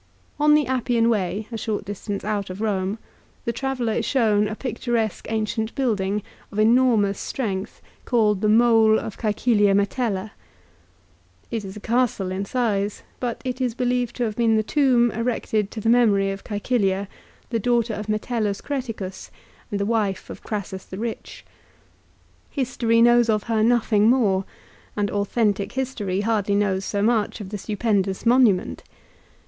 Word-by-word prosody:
l 295 Hz, -, +2 dB
On 300 Hz, 0 st, +7 dB
the 300 Hz, -1 st, +3 dB
Appian 240 Hz, -2 st, +1 dB
way, 200 Hz, 0 st, -1 dB
a 230 Hz, -, -3 dB
short 215 Hz, -2 st, -3 dB
distance 205 Hz, 0 st, -5 dB
out 205 Hz, -2 st, -2 dB
of 185 Hz, +2 st, -7 dB
Rome, 200 Hz, -1 st, -1 dB, 0.5 s
the 235 Hz, -, -1 dB
traveller 255 Hz, -4 st, -2 dB
is 230 Hz, -, -1 dB
shown 215 Hz, -4 st, +2 dB
a 215 Hz, -, -4 dB
picturesque 235 Hz, -3 st, -2 dB
ancient 220 Hz, 0 st, -2 dB
building, 210 Hz, -6 st, 0 dB, 0.3 s
of 205 Hz, -, -8 dB
enormous 220 Hz, -3 st, +3 dB
strength, 200 Hz, -7 st, -4 dB, 0.2 s
called 210 Hz, -5 st, +2 dB
the 215 Hz, -, +2 dB
Mole 225 Hz, -1 st, +5 dB
of 215 Hz, -, -6 dB
Csecilia 210 Hz, -2 st, +2 dB
Metella. 200 Hz, -1 st, -1 dB, 1.2 s
It 225 Hz, -2 st, -2 dB
is 195 Hz, +1 st, -8 dB
a -, -, -7 dB
castle 230 Hz, -4 st, 0 dB
in 190 Hz, +1 st, -3 dB
size, 210 Hz, -4 st, -1 dB, 0.2 s
but 245 Hz, -2 st, -3 dB
is 250 Hz, -2 st, -2 dB
believed 245 Hz, -1 st, 0 dB
to 245 Hz, -, -1 dB
have 215 Hz, -3 st, -2 dB
been 230 Hz, -1 st, +3 dB
the 215 Hz, -, +2 dB
tomb 245 Hz, -2 st, +3 dB
erected 220 Hz, -2 st, -1 dB
to 220 Hz, -, -7 dB
the 215 Hz, -, -3 dB
memory 210 Hz, -5 st, +4 dB
of 195 Hz, 0 st, -7 dB
Csecilia, 200 Hz, -2 st, 0 dB, 0.4 s
the 230 Hz, -, 0 dB
daughter 235 Hz, 0 st, +1 dB
of 210 Hz, 0 st, -5 dB
Metellus 215 Hz, -1 st, -1 dB
Creticus, 225 Hz, -9 st, -5 dB, 0.4 s
and 205 Hz, -, -2 dB
the 200 Hz, -, 0 dB
wife 210 Hz, -3 st, -1 dB
of -, -, -9 dB
Crassus 200 Hz, -3 st, -5 dB
the 190 Hz, -, -9 dB
Rich. 225 Hz, +1 st, -6 dB, 1.0 s
History 235 Hz, -4 st, +1 dB
knows 240 Hz, -1 st, +5 dB
of 215 Hz, -1 st, +2 dB
her 225 Hz, -2 st, 0 dB
nothing 220 Hz, -2 st, +3 dB
more, 200 Hz, -7 st, +2 dB, 0.5 s
and 205 Hz, -1 st, 0 dB
authentic 205 Hz, -1 st, 0 dB
history 230 Hz, -8 st, -2 dB
hardly 205 Hz, -2 st, +1 dB
knows 195 Hz, -2 st, 0 dB
so 200 Hz, -1 st, -1 dB
much 220 Hz, -2 st, +1 dB
of 200 Hz, -3 st, -7 dB
the 210 Hz, 0 st, -5 dB
stupendous 205 Hz, -2 st, -1 dB
monument. 235 Hz, -6 st, +3 dB
220 Hz, 155 wpm, -23 LUFS, 200-240 Hz, 1.2 s, On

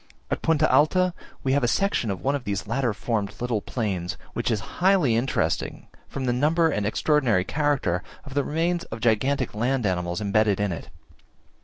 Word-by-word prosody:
At -, -, -1 dB
Punta 155 Hz, -1 st, +3 dB
Alta 175 Hz, +6 st, +4 dB, 0.3 s
we 130 Hz, -, +1 dB
have 140 Hz, -1 st, +2 dB
a -, -, +3 dB
section 195 Hz, -, +1 dB
of 95 Hz, -2 st, -4 dB
one 140 Hz, -, +2 dB
of 140 Hz, -3 st, -2 dB
these 100 Hz, -3 st, -3 dB
later 120 Hz, +2 st, 0 dB
formed 105 Hz, -1 st, -2 dB
little 120 Hz, -3 st, -1 dB
plains, 95 Hz, -8 st, -3 dB, 0.2 s
which -, -, -1 dB
is 110 Hz, -, +1 dB, 0.2 s
highly 185 Hz, -11 st, +4 dB
interesting 115 Hz, -9 st, -1 dB, 0.2 s
from 135 Hz, -, -4 dB
the 120 Hz, -, +1 dB
number 160 Hz, +6 st, +3 dB
and 105 Hz, -8 st, -1 dB
extraordinary 120 Hz, -5 st, +2 dB
character 135 Hz, -, 0 dB, 0.2 s
of 140 Hz, -, -9 dB
the 145 Hz, 0 st, +1 dB
remains 170 Hz, +3 st, 0 dB
of 115 Hz, -, -7 dB
gigantic 120 Hz, +4 st, +1 dB
land 120 Hz, +3 st, 0 dB
animals 90 Hz, -2 st, -1 dB
embedded 105 Hz, -1 st, +2 dB
in 100 Hz, -2 st, 0 dB
it. 85 Hz, -, -6 dB
120 Hz, 180 wpm, -25 LUFS, 105-145 Hz, 0.3 s, Alta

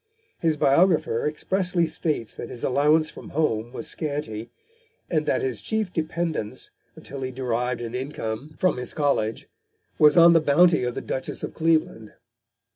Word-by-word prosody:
His 160 Hz, -2 st, +1 dB
biographer 155 Hz, -3 st, +3 dB
expressly 180 Hz, +3 st, 0 dB
states 155 Hz, -7 st, -2 dB
that 120 Hz, -, -7 dB
his 120 Hz, -, -8 dB
allowance 150 Hz, +4 st, +3 dB
from -, -, -11 dB
home 120 Hz, -7 st, -1 dB
was -, -, -5 dB
scanty, 140 Hz, -8 st, -4 dB, 0.6 s
and -, -, 0 dB
that -, -, +1 dB
his 395 Hz, -, -2 dB
chief 220 Hz, -4 st, -2 dB
dependence, 160 Hz, -7 st, -3 dB, 0.2 s
until 140 Hz, -1 st, -9 dB
he 130 Hz, -, -2 dB
derived 125 Hz, -1 st, -2 dB
an 115 Hz, -1 st, -5 dB
income 130 Hz, +1 st, -5 dB
from 185 Hz, -7 st, +1 dB
his 125 Hz, -1 st, -6 dB
college, 140 Hz, -7 st, 0 dB, 0.5 s
was 150 Hz, +2 st, +6 dB
on 170 Hz, 0 st, +8 dB
the 165 Hz, -, +5 dB
bounty 160 Hz, +1 st, +4 dB
of 125 Hz, -, -3 dB
the -, -, -3 dB
Duchess 130 Hz, -, -4 dB
of -, -, -4 dB
Cleveland. 155 Hz, -9 st, 0 dB
150 Hz, 155 wpm, -24 LUFS, 125-165 Hz, 0.6 s, on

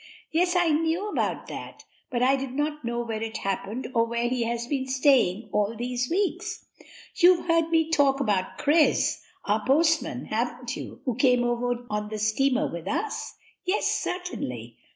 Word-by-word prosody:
"Yes, 355 Hz, +3 st, +2 dB
I 350 Hz, -2 st, +3 dB
knew 330 Hz, +7 st, 0 dB
about -, -, -1 dB
that, -, -, -9 dB, 0.2 s
but 245 Hz, -2 st, 0 dB
I 265 Hz, +2 st, +5 dB
do 270 Hz, 0 st, -3 dB
not 295 Hz, +3 st, -2 dB
know 235 Hz, 0 st, -2 dB
where 225 Hz, -2 st, -4 dB
it 225 Hz, 0 st, -3 dB
happened 195 Hz, +5 st, -3 dB
or 230 Hz, -2 st, +4 dB
where 235 Hz, +1 st, -1 dB
he 245 Hz, -1 st, 0 dB
has 235 Hz, 0 st, -2 dB
been 265 Hz, 0 st, -2 dB
staying 260 Hz, -7 st, +3 dB
all 210 Hz, +2 st, +1 dB
these 245 Hz, +1 st, -2 dB
weeks." 375 Hz, +1 st, -1 dB, 0.5 s
"You've 355 Hz, 0 st, +5 dB
heard 330 Hz, -1 st, +2 dB
me 325 Hz, -1 st, +2 dB
talk 280 Hz, -3 st, +3 dB
about 205 Hz, -8 st, 0 dB
Chris, 305 Hz, +1 st, +3 dB, 0.2 s
our 210 Hz, +1 st, +1 dB
postman, 310 Hz, 0 st, +2 dB
haven't 240 Hz, +3 st, -2 dB
you, -, -, -8 dB
who 255 Hz, -, 0 dB
came 250 Hz, 0 st, +3 dB
over 245 Hz, 0 st, -1 dB
on 210 Hz, 0 st, -2 dB
the 215 Hz, -, -4 dB
steamer 250 Hz, +5 st, +2 dB
with 170 Hz, +1 st, -7 dB
us?" 430 Hz, -, -3 dB, 0.3 s
"Yes, 385 Hz, +2 st, 0 dB
certainly." 125 Hz, -, -3 dB
255 Hz, 170 wpm, -26 LUFS, 230-315 Hz, 0.5 s, I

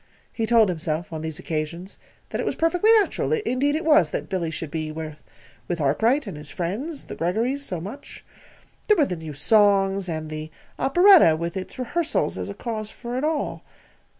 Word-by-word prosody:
He 225 Hz, -1 st, -2 dB
told 225 Hz, -3 st, +5 dB
himself, 160 Hz, -1 st, -3 dB
on 160 Hz, -, -4 dB
these 160 Hz, -1 st, -4 dB
occasions, 165 Hz, +4 st, -5 dB, 0.3 s
that -, -, -2 dB
it -, -, -2 dB
was -, -, -2 dB
perfectly 355 Hz, +6 st, +3 dB
natural 440 Hz, +1 st, +2 dB
indeed 290 Hz, -, 0 dB
it 315 Hz, -, -2 dB
was! 315 Hz, 0 st, +5 dB
that -, -, -4 dB
Billy 180 Hz, -4 st, -1 dB
should 160 Hz, -1 st, -5 dB
be 155 Hz, -1 st, -3 dB
with 155 Hz, 0 st, -8 dB
Arkwright 225 Hz, -, +2 dB
and 195 Hz, -6 st, -6 dB
his 150 Hz, -1 st, -9 dB
friends, 235 Hz, -, -4 dB
the -, -, -8 dB
Greggorys, 225 Hz, +11 st, -1 dB
so 185 Hz, -11 st, -3 dB
much. 205 Hz, -, -9 dB, 0.6 s
There 425 Hz, -, +5 dB
were 300 Hz, -, +4 dB
the 180 Hz, -, -3 dB
new 160 Hz, -2 st, -8 dB
songs, 195 Hz, +2 st, +3 dB
and 155 Hz, -1 st, -4 dB
the 155 Hz, 0 st, -5 dB, 0.3 s
operetta 350 Hz, -, +6 dB
with 170 Hz, +1 st, -4 dB
its 185 Hz, -1 st, -5 dB
rehearsals 310 Hz, +6 st, 0 dB
as -, -, -5 dB
a -, -, -6 dB
cause 215 Hz, -3 st, -4 dB
for 240 Hz, +2 st, -7 dB
it 260 Hz, -, -2 dB
all. 310 Hz, 0 st, -2 dB
195 Hz, 185 wpm, -24 LUFS, -, 0.6 s, operetta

